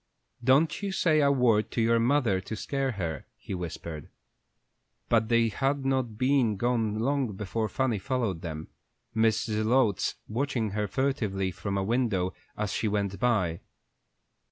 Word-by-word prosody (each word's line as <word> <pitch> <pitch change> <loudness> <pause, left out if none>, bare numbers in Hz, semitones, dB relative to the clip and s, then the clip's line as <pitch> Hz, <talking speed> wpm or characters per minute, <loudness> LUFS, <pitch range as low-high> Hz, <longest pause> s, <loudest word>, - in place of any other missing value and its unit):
"Don't 145 +8 +3
you 200 -1 -2
say 165 -5 +3
a 140 -1 +4
word 115 -5 +3
to - - -3
your 115 0 +3
mother 115 -6 +2
to 110 - -6
scare 135 +4 -2
her," 80 -8 -4
he - - -7
whispered. 85 -3 -6 1.0
But 110 -1 +3
they 115 -1 +4
had 135 +5 -1
not 130 -5 0
been 130 -4 +2
gone 115 -1 0
long 130 -1 0
before 105 +3 -2
Fanny 130 -6 0
followed 115 -7 -1
them, 80 -2 -6 0.5
Mrs. 110 -1 +2
Zelotes 110 -3 +2
watching 120 -2 -1
her 105 +1 -1
furtively 105 -6 -1
from 100 +3 -3
a 95 - 0
window 105 -5 0 0.2
as 105 -1 -2
she 110 - 0
went 100 -2 -1
by. 95 -9 +1
110 Hz, 150 wpm, -28 LUFS, 100-130 Hz, 1.0 s, a